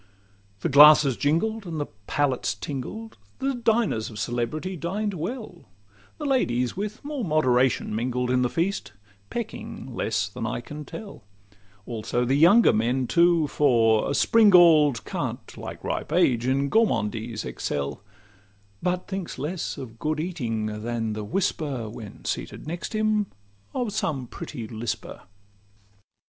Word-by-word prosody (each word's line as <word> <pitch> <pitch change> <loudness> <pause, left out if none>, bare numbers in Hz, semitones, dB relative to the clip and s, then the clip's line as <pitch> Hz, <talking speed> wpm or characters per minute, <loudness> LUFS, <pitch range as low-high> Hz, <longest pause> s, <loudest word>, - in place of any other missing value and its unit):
The - - 0
glasses 145 -1 +8
jingled, 200 - 0
and 160 -2 -4
the 145 - -1 0.2
palates 135 -6 0
tingled; 140 - -6 0.2
The 270 +1 -1
diners 225 - +1
of 110 - -10
celebrity 120 - -2
dined 200 +5 -2
well; 185 +2 -6 0.5
The 300 - -5
ladies 125 - +1
with 210 +6 -5
more 290 -4 -3
moderation 130 - +2
mingled 125 +2 -1
In 125 0 +3
the 125 - +2
feast, 175 - -2 0.4
pecking 200 - -6
less 110 -2 -1
than 110 +2 -5
I 120 - -2
can 150 +5 -8
tell; 210 - -9 0.6
Also 120 +1 -2
the 130 - +1
younger 175 +11 +6
men 125 +4 +1
too: 170 +3 +4
for 115 -7 +3
a 140 - 0
springald 170 - +6
Can't, - - -4
like - - -8
ripe - - -3
age, 120 -1 +3
in 140 +2 +1
gormandize 115 - 0
excel, 70 +4 -3 0.8
But 180 0 -1
thinks 190 -3 -5
less 160 +4 -3
of 115 -3 -9
good 155 +3 -1
eating 115 -11 -3
than 115 -1 -2
the 105 0 -4
whisper 135 - -1
(When 110 -2 -10
seated - - -4
next 170 +6 -5
him) 215 -1 +1 0.5
of 240 -5 -1
some 150 -11 -1
pretty 125 -3 -7
lisper. 110 -1 -5
145 Hz, 135 wpm, -25 LUFS, 120-185 Hz, 0.8 s, glasses